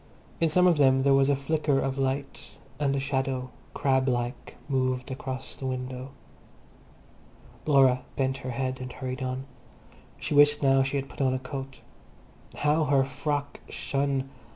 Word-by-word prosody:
In 165 Hz, -, +3 dB
some 180 Hz, +4 st, +4 dB
of 175 Hz, -3 st, +5 dB
them 135 Hz, -1 st, +5 dB
there 140 Hz, 0 st, +5 dB
was 135 Hz, 0 st, +4 dB
a 140 Hz, -, +4 dB
flicker 145 Hz, 0 st, +1 dB
of 135 Hz, 0 st, -2 dB
light, 135 Hz, +1 st, -3 dB, 0.2 s
and 140 Hz, -2 st, +1 dB
a -, -, 0 dB
shadow, 135 Hz, -2 st, -2 dB, 0.2 s
crab 130 Hz, -1 st, +2 dB
like, 120 Hz, 0 st, -3 dB
moved 130 Hz, -1 st, 0 dB
across 130 Hz, 0 st, -6 dB
the 135 Hz, -, -5 dB
window. 130 Hz, 0 st, -4 dB, 1.6 s
Laura 135 Hz, -3 st, +5 dB
bent 135 Hz, -1 st, 0 dB
her 130 Hz, -2 st, -6 dB
head 130 Hz, +1 st, -2 dB
and 125 Hz, 0 st, -6 dB
hurried 130 Hz, 0 st, -5 dB
on. 130 Hz, +1 st, -3 dB, 0.7 s
She -, -, -3 dB
wished 145 Hz, 0 st, +5 dB
now 135 Hz, -1 st, +5 dB
she 135 Hz, +1 st, -1 dB
had 135 Hz, 0 st, -3 dB
put -, -, -8 dB
on 130 Hz, -1 st, +2 dB
a -, -, +1 dB
coat. 135 Hz, +1 st, -7 dB, 0.8 s
How 150 Hz, +2 st, +3 dB
her 140 Hz, -2 st, +4 dB
frock 145 Hz, +2 st, -3 dB
shone! 135 Hz, -1 st, -1 dB
135 Hz, 160 wpm, -27 LUFS, 130-140 Hz, 1.6 s, of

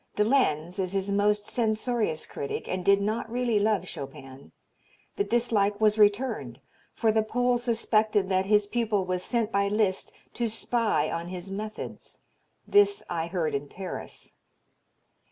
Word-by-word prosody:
De 210 Hz, -, +3 dB
Lenz 185 Hz, -, +1 dB
is 185 Hz, 0 st, -1 dB
his 195 Hz, 0 st, -1 dB
most 205 Hz, +1 st, +2 dB
censorious 220 Hz, -6 st, -1 dB
critic 140 Hz, -, -5 dB
and 185 Hz, -1 st, -3 dB
did 200 Hz, +1 st, +5 dB
not 220 Hz, +3 st, -2 dB
really 240 Hz, -3 st, +1 dB
love 205 Hz, -3 st, +1 dB
Chopin. 135 Hz, -3 st, -9 dB, 0.6 s
The 405 Hz, -, +1 dB
dislike 215 Hz, -, +1 dB
was 215 Hz, 0 st, +3 dB
returned, 210 Hz, +5 st, +2 dB, 0.4 s
for 225 Hz, -2 st, +2 dB
the 220 Hz, 0 st, +3 dB
Pole 245 Hz, +2 st, +1 dB
suspected 220 Hz, -4 st, +1 dB
that 190 Hz, 0 st, +1 dB
his 210 Hz, 0 st, +4 dB
pupil 210 Hz, -3 st, 0 dB
was 180 Hz, 0 st, -2 dB
sent 230 Hz, -1 st, -1 dB
by 200 Hz, -1 st, +2 dB
Liszt 200 Hz, -2 st, 0 dB, 0.2 s
to 235 Hz, -, -1 dB
spy 220 Hz, -8 st, 0 dB
on 170 Hz, +1 st, -3 dB
his 185 Hz, +1 st, -7 dB
methods. 215 Hz, +2 st, -7 dB, 0.5 s
This 405 Hz, 0 st, +4 dB
I 165 Hz, -1 st, -1 dB
heard 170 Hz, -3 st, -1 dB
in 140 Hz, +1 st, -2 dB
Paris. 190 Hz, -1 st, -7 dB
210 Hz, 150 wpm, -27 LUFS, 185-225 Hz, 0.6 s, did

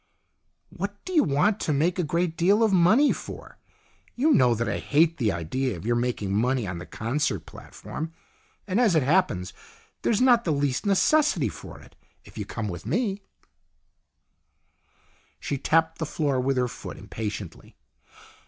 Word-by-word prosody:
"What 200 Hz, +3 st, -6 dB
do 370 Hz, -, -5 dB
you 320 Hz, -, +5 dB
want 160 Hz, +9 st, +1 dB
to -, -, -1 dB
make 165 Hz, +6 st, +1 dB
a -, -, +2 dB
great 170 Hz, +1 st, -1 dB
deal 195 Hz, +7 st, +3 dB
of 215 Hz, -3 st, +2 dB
money 210 Hz, +11 st, +5 dB
for? -, -, -10 dB, 0.6 s
You 295 Hz, +6 st, +2 dB
know 125 Hz, -, +4 dB
that 115 Hz, +1 st, -2 dB
I -, -, -2 dB
hate 165 Hz, +3 st, +2 dB
the 115 Hz, -6 st, +1 dB
idea 95 Hz, +8 st, -2 dB
of 85 Hz, -, -10 dB
your 120 Hz, +1 st, +1 dB
making 120 Hz, -5 st, -1 dB
money 125 Hz, +2 st, +1 dB
on 90 Hz, -3 st, -5 dB
the 90 Hz, -, -9 dB
concert 115 Hz, -, -2 dB
platform. 160 Hz, +1 st, -8 dB, 0.6 s
And, 200 Hz, +5 st, +1 dB
as 215 Hz, -8 st, +3 dB
it 155 Hz, -, +3 dB
happens, 135 Hz, -, +1 dB, 0.5 s
there -, -, +1 dB
is 215 Hz, -, +2 dB
not 245 Hz, -2 st, +5 dB
the 160 Hz, -, 0 dB
least 140 Hz, +4 st, -1 dB
necessity 200 Hz, -, +3 dB
for -, -, -10 dB
it. -, -, -18 dB, 0.3 s
If -, -, -16 dB
you -, -, -4 dB
come 110 Hz, -2 st, -4 dB
with 85 Hz, -4 st, -6 dB
me 200 Hz, -, -1 dB, 1.1 s
" -, -, -40 dB
She 140 Hz, -, -3 dB
tapped 160 Hz, +3 st, +1 dB
the 160 Hz, -, -2 dB
floor 145 Hz, -5 st, 0 dB
with 135 Hz, +1 st, 0 dB
her 125 Hz, -1 st, +2 dB
foot -, -, -9 dB
impatiently. 105 Hz, -5 st, -7 dB
150 Hz, 170 wpm, -25 LUFS, 120-190 Hz, 1.1 s, you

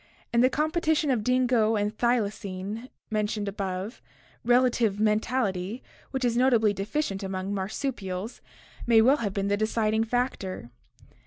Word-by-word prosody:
In 235 Hz, -, +4 dB
the 255 Hz, -, +5 dB
competition 310 Hz, 0 st, +1 dB
of 230 Hz, -5 st, 0 dB
dingo 245 Hz, -3 st, +2 dB
and 210 Hz, +1 st, -1 dB
thylacine 215 Hz, -1 st, -2 dB, 0.2 s
mentioned 210 Hz, -1 st, -1 dB
above, 195 Hz, +2 st, -4 dB, 0.4 s
relative 240 Hz, -4 st, +3 dB
mentality, 215 Hz, -1 st, 0 dB, 0.3 s
which 265 Hz, -2 st, -2 dB
is 235 Hz, -1 st, +1 dB
notably 235 Hz, -4 st, +4 dB
deficient 200 Hz, +1 st, -2 dB
among 190 Hz, 0 st, -3 dB
marsupials, 200 Hz, 0 st, -4 dB, 0.5 s
may 230 Hz, -2 st, +6 dB
well 260 Hz, +6 st, +5 dB
have 205 Hz, -8 st, -3 dB
been 200 Hz, 0 st, 0 dB
the 205 Hz, 0 st, +1 dB
deciding 220 Hz, 0 st, +1 dB
factor. 220 Hz, -, -2 dB
220 Hz, 130 wpm, -27 LUFS, 200-250 Hz, 0.5 s, may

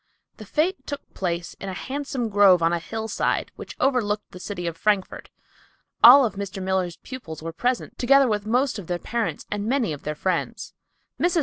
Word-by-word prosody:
The 215 Hz, -, -11 dB
fete 345 Hz, -, -1 dB
took 285 Hz, -1 st, -7 dB
place 170 Hz, -2 st, -3 dB
in 195 Hz, -, -5 dB
a 185 Hz, -, -5 dB
handsome 270 Hz, -1 st, -3 dB
grove 195 Hz, -4 st, +5 dB
on 165 Hz, +1 st, +3 dB
a 170 Hz, -, 0 dB
hillside 220 Hz, +6 st, -2 dB
which -, -, -9 dB
overlooked 225 Hz, -6 st, 0 dB
the 180 Hz, -, -10 dB
city 180 Hz, -2 st, -5 dB
of 170 Hz, -1 st, -3 dB
Frankfort. 200 Hz, +2 st, -1 dB, 0.7 s
All 260 Hz, +3 st, +10 dB
of 215 Hz, -, -2 dB
Mr. 200 Hz, -1 st, -5 dB
Miller's 185 Hz, -2 st, -1 dB
pupils 170 Hz, -13 st, -9 dB
were 165 Hz, 0 st, -5 dB
present, 245 Hz, +7 st, -2 dB
together 275 Hz, +2 st, +5 dB
with 210 Hz, -2 st, -1 dB
most 250 Hz, 0 st, +1 dB
of 180 Hz, -, -9 dB
their 175 Hz, -, -1 dB
parents 235 Hz, +5 st, -3 dB
and 205 Hz, 0 st, -2 dB
many 245 Hz, -, +1 dB
of 145 Hz, -, -8 dB
their 150 Hz, 0 st, -4 dB
friends. 180 Hz, +2 st, -2 dB, 0.5 s
Mrs. 350 Hz, -1 st, +2 dB
205 Hz, 190 wpm, -24 LUFS, 180-250 Hz, 0.7 s, All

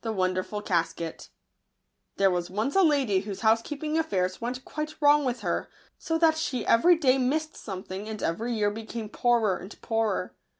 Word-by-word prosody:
®! -, -, -43 dB
)t 225 Hz, -, -3 dB
Wonderful 185 Hz, 0 st, -1 dB
■ 165 Hz, -3 st, -2 dB, 0.9 s
HERE 195 Hz, -1 st, +4 dB
was 175 Hz, 0 st, -2 dB
once 215 Hz, +9 st, -2 dB
a 390 Hz, -, +6 dB
lady 275 Hz, -, +3 dB
whose 200 Hz, 0 st, -6 dB
housekeeping 280 Hz, +8 st, +1 dB
affairs 185 Hz, -, -1 dB
went 250 Hz, +2 st, -4 dB
quite 305 Hz, 0 st, -5 dB
wrong 290 Hz, -1 st, +5 dB
with 245 Hz, -3 st, -2 dB
her, 175 Hz, -4 st, -2 dB, 0.3 s
so 325 Hz, -, -1 dB
that 325 Hz, -1 st, +4 dB
she 255 Hz, -7 st, -2 dB
every 345 Hz, +10 st, +5 dB
day 270 Hz, -4 st, +3 dB
missed 310 Hz, +5 st, 0 dB
something, 190 Hz, +1 st, -7 dB
and 215 Hz, -1 st, -5 dB
every 220 Hz, +9 st, -1 dB
year 210 Hz, -2 st, +1 dB
became 225 Hz, 0 st, -6 dB
poorer 225 Hz, -4 st, +2 dB
and 190 Hz, +3 st, -11 dB
poorer. 225 Hz, -1 st, -1 dB
225 Hz, 175 wpm, -27 LUFS, 195-285 Hz, 0.9 s, a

